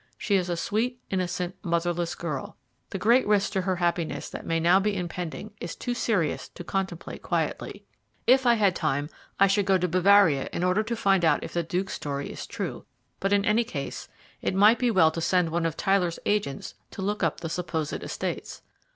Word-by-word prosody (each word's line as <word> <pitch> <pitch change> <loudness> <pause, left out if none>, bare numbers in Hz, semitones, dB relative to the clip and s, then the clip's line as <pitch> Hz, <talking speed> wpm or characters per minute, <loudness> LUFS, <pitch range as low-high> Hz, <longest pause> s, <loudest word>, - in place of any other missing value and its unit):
She 205 - -2
is 180 -2 +1
a 175 - -1
sweet, 235 +7 -1
innocent, 180 -1 -2
motherless 170 0 -1
girl. 150 -6 -5 0.3
The - - -4
great 235 +6 +4
risk 205 -1 +2
to 195 -2 0
her 185 0 0
happiness 170 -4 -1
that - - -7
may 165 0 +1
now 175 +3 +5
be 200 0 0
impending 180 +3 -5
is - - -5
too 245 - -3
serious 205 -10 0
to 175 - -10
contemplate 190 -2 -4
quietly. - - -2 0.4
If 260 0 +5
I 240 - +6
had 200 -5 +3
time 145 -1 -1 0.3
I 195 - +7
should 195 0 +2
go 190 -1 +5
to 180 0 0
Bavaria 185 -4 +4
in 175 - -2
order 180 +3 +3
to 230 +2 -3
find 195 -5 +2
out 160 - +3
if - - -7
the 175 - +1
Duke's 180 +4 -2
story 140 -1 -4
is - - -7
true; - - -5 0.4
but 195 - -1
in 200 0 +3
any 215 +3 +3
case, 145 -12 -6 0.3
it - - -1
might 210 +4 +6
be 245 - +2
well 175 -8 +5
to 165 - -4
send 180 -1 +2
one 170 0 +1
of 160 - -5
Tyler's 185 -3 +1
agents 205 -10 -1 0.2
to 190 - -6
look 205 +2 -1
up 165 -4 0
the 165 - -3
supposed 160 -3 -3
estates." - - -5
185 Hz, 205 wpm, -26 LUFS, 170-205 Hz, 0.4 s, I